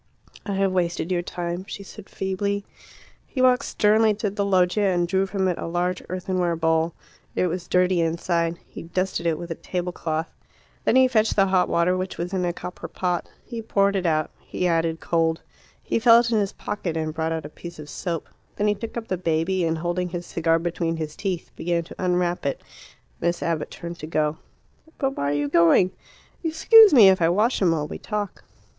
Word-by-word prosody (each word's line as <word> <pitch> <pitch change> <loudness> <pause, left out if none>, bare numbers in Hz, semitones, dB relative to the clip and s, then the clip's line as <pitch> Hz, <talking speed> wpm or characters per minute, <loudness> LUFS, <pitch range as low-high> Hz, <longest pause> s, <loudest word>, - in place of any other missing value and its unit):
"I 200 - -1
have 195 0 +1
wasted 175 -1 -1
your 175 -1 +1
time," 175 0 -4
she 200 - -7
said 200 +1 -12
feebly. 200 +1 -2 0.6
He 265 - -6
walked 255 +1 +4
sternly 215 +1 +3
to 210 -1 -2
the 200 0 -1
loggia 195 +1 +2
and 175 -1 +1
drew 190 +2 +1
from 190 -1 0
it 180 - -1
a - - -4
large 175 +1 -1
earthenware 180 -1 -1
bowl. 160 0 +1 0.4
It - - +2
was 180 0 -3
dirty 180 -1 +2
inside; 170 0 0
he - - -10
dusted 185 0 -2
it 160 -2 +1
with 175 +1 -7
a - - +1
tablecloth. 170 -2 -3 0.5
Then - - +3
he 260 0 +6
fetched 225 -3 +2
the 195 - +5
hot 190 -1 +2
water, 170 +2 +2
which 185 0 -4
was 175 +2 -4
in 185 -1 0
a 175 - +1
copper 180 +1 -7
pot. 180 -2 -2 0.2
He 235 -2 -6
poured 200 -2 +1
it 185 -2 0
out. 155 -1 +1
He 180 - -4
added 165 -1 +1
cold. 165 -1 +1 0.4
He - - 0
felt 235 0 +6
in 220 - +3
his 200 -1 -1
pocket 175 -6 -4
and 155 -1 -2
brought 160 0 -2
out 160 -1 -3
a - - -7
piece 170 +2 -10
of 150 -1 -9
soap. 170 +1 -4 0.3
Then 210 - 0
he 210 - +3
took 230 +3 -7
up 225 -1 -5
the 185 - -1
baby, 175 +2 0
and, 165 0 0
holding 175 +2 -2
his 175 0 -5
cigar 165 -1 +1
between 165 0 -2
his 155 -1 -5
teeth, 190 -4 -4
began 170 0 -1
to 170 - -9
unwrap 180 -1 0
it. 140 - -2 0.6
Miss 170 0 -1
Abbott 165 -2 -1
turned 170 0 -8
to 155 - -6
go. 155 -1 0 0.6
"But 270 -1 -1
why 140 - -1
are - - 0
you 145 0 0
going? 170 +4 +4 0.5
Excuse 400 +7 +7
me 230 -8 +8
if 190 -1 +3
I 165 - +4
wash 210 +8 +2
him 185 - +4
while 155 -3 0
we - - -7
talk." 210 -2 -4
180 Hz, 205 wpm, -24 LUFS, 165-195 Hz, 0.6 s, me